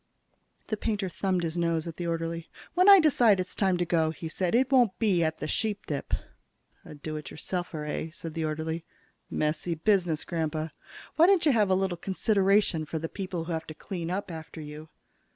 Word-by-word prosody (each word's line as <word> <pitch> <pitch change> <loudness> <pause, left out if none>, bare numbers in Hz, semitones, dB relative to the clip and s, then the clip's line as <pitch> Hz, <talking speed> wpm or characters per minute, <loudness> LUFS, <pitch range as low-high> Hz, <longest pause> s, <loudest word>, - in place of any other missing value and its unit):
The 215 - -2
painter 205 -3 -1
thumbed 185 -1 -1
his 165 +1 -2
nose 165 -2 +1
at 165 -2 -7
the 175 - -3
orderly. 165 0 -3 0.2
"When 365 +3 +5
I 395 -1 +11
decide 245 - +4
it's 185 - -3
time 190 -3 +2
to 175 - 0
go," 160 -2 +2
he 160 +1 -6
said, 180 +4 0
"it 260 +2 +3
won't 240 -8 +4
be 195 -7 +2
at 160 0 0
the - - -4
Sheepdip." 200 -4 -2 0.7
"A - - -10
do 155 +1 -5
it 150 -3 -7
yourselfer, 170 -2 -4
eh?" 155 +2 -3
said 165 -1 -7
the 165 - -2
orderly. 160 +2 -3 0.5
"Messy 155 +3 -1
business, 175 -3 +1
Grandpa. 160 -2 -2 0.5
Why 330 +2 +7
don't 380 -4 +4
you 300 - +6
have 215 -5 +3
a 185 - +4
little 190 -2 0
consideration 195 -2 +2
for 160 +1 -4
the 165 +1 -4
people 185 -4 -4
who 170 - -6
have 160 -1 -3
to 155 - -8
clean 170 -2 -5
up 190 +1 -3
after 160 0 -8
you?" 150 +1 -8
170 Hz, 200 wpm, -28 LUFS, 160-200 Hz, 0.7 s, I